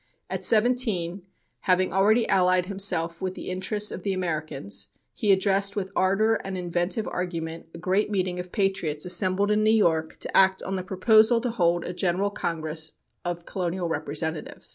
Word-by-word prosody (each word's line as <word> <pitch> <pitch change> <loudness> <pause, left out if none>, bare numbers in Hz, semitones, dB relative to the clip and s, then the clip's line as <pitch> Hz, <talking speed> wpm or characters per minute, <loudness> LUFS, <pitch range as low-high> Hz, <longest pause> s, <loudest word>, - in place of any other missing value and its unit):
At - - -3
seventeen, 215 -6 +2 0.4
having 185 -1 +1
already 215 +5 +3
allied 185 -1 +3
himself 180 -4 0
with 185 -1 -3
the - - -6
interests 205 +3 +1
of - - -6
the 195 +1 -1
Americans, 150 - -2 0.3
he 210 - +1
addressed 195 +1 +2
with 190 -2 -3
ardor 215 +4 +2
and 195 -1 -5
inventive 175 +4 -2
argument 165 -2 -4
a - - -7
great 190 +5 0
meeting 185 -3 -1
of 180 0 -7
patriots 190 -7 -1
assembled 185 +2 +2
in 210 0 +2
New 215 - +3
York 165 -8 +2
to - - -5
act 190 0 +4
on 195 - -3
the 185 - -2
proposal 220 +5 +4
to 245 -1 -2
hold 175 -5 +1
a 180 - -5
general 185 +2 0
congress 160 -3 -3 0.3
of 175 -1 -4
colonial 180 -1 -3
representatives. 155 +1 -4
185 Hz, 165 wpm, -25 LUFS, 170-200 Hz, 0.4 s, act